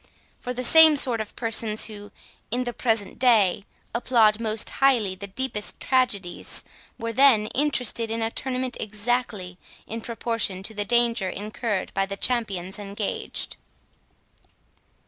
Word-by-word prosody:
For 250 - -5
the 250 0 -4
same 315 +3 +7
sort 240 -5 +3
of 215 - -8
persons, 225 -2 +1
who, 205 -2 -10 0.4
in 245 +3 -1
the 240 -1 -4
present 220 -5 -1
day, 210 -6 +3 0.3
applaud 230 -3 +3
most 220 -1 -1
highly 240 -8 +3
the 200 +2 -8
deepest 210 +1 -3
tragedies, 205 -9 0 0.3
were 230 0 -4
then 250 -4 +5
interested 250 -5 +1
in 225 0 -2
a 225 - -2
tournament 255 0 -2
exactly 210 -4 -3 0.3
in 225 +1 -6
proportion 225 -5 -2
to 220 - -4
the 205 -1 -3
danger 235 -4 +1
incurred 210 +1 -4
by 195 0 0
the 195 0 -6
champions 195 -6 -1
engaged. 200 0 -3
225 Hz, 135 wpm, -24 LUFS, 205-245 Hz, 0.4 s, same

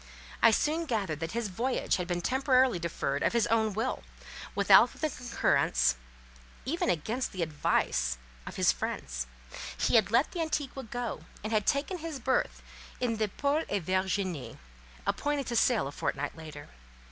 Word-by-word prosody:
I 230 - +8
soon 310 +9 +1
gathered 200 - -1
that 165 +3 -4
his 235 -1 -1
voyage 240 +7 0
had 180 -1 -3
been 175 -1 -1
temporarily 255 -1 +3
deferred 150 -4 -2
of - - +2
his 235 -1 +3
own 220 -1 +2
will, 225 +6 -2 0.5
without - - +7
the 310 -1 -2
concurrence, 70 - +2 0.7
even 320 +7 0
against 215 - -1
the 185 -3 -1
advice, 150 - 0 0.3
of - - -6
his - - +4
friends; - - -4 0.5
he - - +4
had 215 - +3
let 235 +6 +3
the 350 - -3
Antigua 285 -5 -2
go, 240 +1 -4 0.2
and 215 +1 -3
had 210 -2 +1
taken 300 +6 +1
his 320 -3 -5
berth 260 +1 0 0.4
in 235 -3 0
the 215 -1 +1
Paul 285 +9 0
et 200 -3 -1
Virginie, 185 -3 -1 0.5
appointed 290 -2 0
to 240 - -3
sail 235 - +3
a - - -5
fortnight 145 0 -3
later. 155 -3 -10
225 Hz, 160 wpm, -30 LUFS, 175-265 Hz, 0.7 s, I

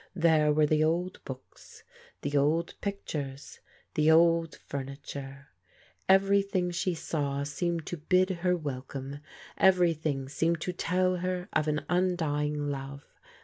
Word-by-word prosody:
There 160 -3 +4
were 150 0 +4
the 155 +1 +2
old 175 +3 -1
books, 130 -1 -11 0.4
the 145 0 -2
old 155 +4 +2
pictures, 150 -9 -5 0.3
the 155 +1 +3
old 165 0 +4
furniture. 140 0 -7 0.6
Everything 195 -1 +3
she 175 0 -1
saw 140 -3 -2
seemed 165 +3 -2
to 175 - -4
bid 185 +5 +2
her 180 0 +2
welcome, 135 -1 -6 0.4
every 180 -3 +5
thing 145 -4 -3
seemed 165 +4 0
to 180 - -2
tell 185 +1 +1
her 180 +1 -3
of 155 0 +1
an 150 0 -1
undying 150 -5 0
love. 140 0 -6
160 Hz, 130 wpm, -29 LUFS, 145-180 Hz, 0.6 s, every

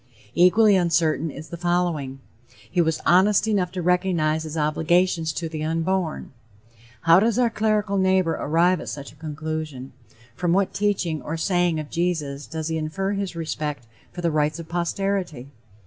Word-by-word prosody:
Equally 200 +4 +5
uncertain 165 -3 +1
is 150 +2 -9
the 170 - -6
following: 170 -6 -1 0.5
"He 175 - +2
was 160 -1 0
honest 195 +4 +4
enough 195 -5 +1
to 180 -2 -3
recognize 175 -3 +1
his 155 +1 -6
obligations 160 +2 +1
to 165 - -3
the 155 -1 -5
unborn." 165 +1 -1 0.7
How 165 +1 +6
does 225 +2 +1
our 245 -2 +2
clerical 210 -2 0
neighbor 190 -2 +2
arrive 170 +4 +2
at - - -6
such 140 -1 -7
a - - -19
conclusion? 155 -3 -5 0.4
From 175 +4 0
what 195 0 +1
teaching 185 -7 -1
or 155 +5 -4
saying 175 -1 +1
of 150 -1 -7
Jesus 155 -5 -2
does 160 -1 -4
he 160 0 -1
infer 190 +6 -2
his 195 -3 -3
respect 150 -5 -4 0.3
for 175 - -7
the 170 -1 +1
rights 150 0 +1
of 165 -1 -8
posterity? 175 -5 -2
170 Hz, 165 wpm, -23 LUFS, 155-185 Hz, 0.7 s, How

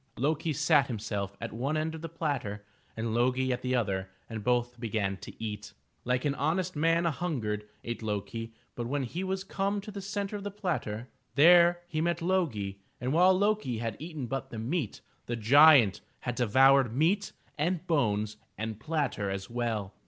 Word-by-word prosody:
Lo'kisat 150 +1 +2
himself 105 -4 -4
at - - -5
one 135 +7 -1
end 155 +1 -1
of 160 - -7
the 165 - -5
platter 135 -11 -3 0.3
and 110 0 -2
Lo'gi 130 +2 +2
at 125 - -1
the 130 0 0
other 95 -5 -1 0.2
and 110 -2 -6
both 120 +1 0
began 105 -4 -1
to - - -9
eat. 105 -2 -5 0.3
Like 125 +2 0
an 145 - +2
honest 170 +6 -1
man 165 +3 +2
an 165 - +2
hungered, 110 -9 -3
ate 120 0 -4
Lo'ki, 110 +2 -4 0.2
but 120 -1 -4
when 140 +2 -1
he 165 +9 -4
was 190 0 -2
come 200 +1 -1
to 210 +2 -8
the 200 -1 -6
center 200 +1 -3
of 200 - -5
the 205 - -3
platter, 155 - -3 0.3
there 175 +3 +7
he 155 -2 -2
met 170 0 0
Lo'gi, 145 - -1 0.2
and 125 +3 -1
while 185 +3 +5
Lo'ki 205 - +1
had 115 -1 -3
eaten 155 -3 -5
but 135 +3 -4
the 115 - -7
meat, 120 - -2 0.3
the 120 - -1
giant 125 - +6 0.2
had 125 - -2
devoured 130 +2 +5
nieat 185 +8 +2 0.2
and 170 +4 -1
bones 110 - +1 0.2
and 110 0 -4
platter 145 -9 -1
as 95 +2 -5
well! 115 -5 -2
130 Hz, 180 wpm, -29 LUFS, 110-165 Hz, 0.3 s, there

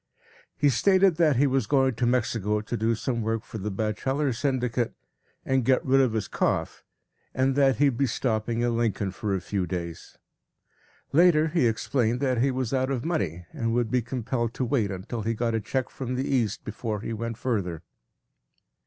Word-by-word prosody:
He 145 - +4
stated 190 - +4
that 160 -5 +4
he 135 +4 +4
was 130 -5 +1
going 135 -2 +3
to 120 +1 0
Mexico 115 -4 +1
to 110 +3 -4
do 115 0 +1
some 120 +1 -2
work 110 0 -1
for 110 - -8
the 105 +2 -3
Bacheller 120 +7 -1
Syndicate 125 -2 -1 0.5
and 130 -1 +1
get 130 +2 +2
rid 135 0 +4
of 125 -4 +2
his 110 -2 -1
cough, - - -1 0.5
and 130 +1 +2
that 135 -2 +4
he 140 +4 +4
would 120 - -7
be 140 - +3
stopping 115 -1 -1
in 120 -1 +1
Lincoln 105 -4 0
for 100 +1 -2
a - - -1
few 90 0 -2
days. 85 -1 -6 1.0
Later 160 -1 +5
he 155 -6 +2
explained 115 +1 0
that 130 -3 +1
he 135 - +3
was 130 -2 -2
out 130 0 +1
of 130 -3 -2
money 90 - -2
and 115 -6 -1
would 120 -2 0
be 125 -1 +2
compelled 120 -1 -3
to 130 - -1
wait 115 -5 +1
until 100 +5 -5
he 115 +2 -1
got 115 +1 -1
a 115 - 0
check 130 +5 -2
from 130 -1 -4
the 130 +2 -2
East 120 -7 0
before 110 -1 -4
he 115 - -4
went 115 0 -4
further. 100 -10 -2
120 Hz, 195 wpm, -26 LUFS, 110-130 Hz, 1.0 s, Later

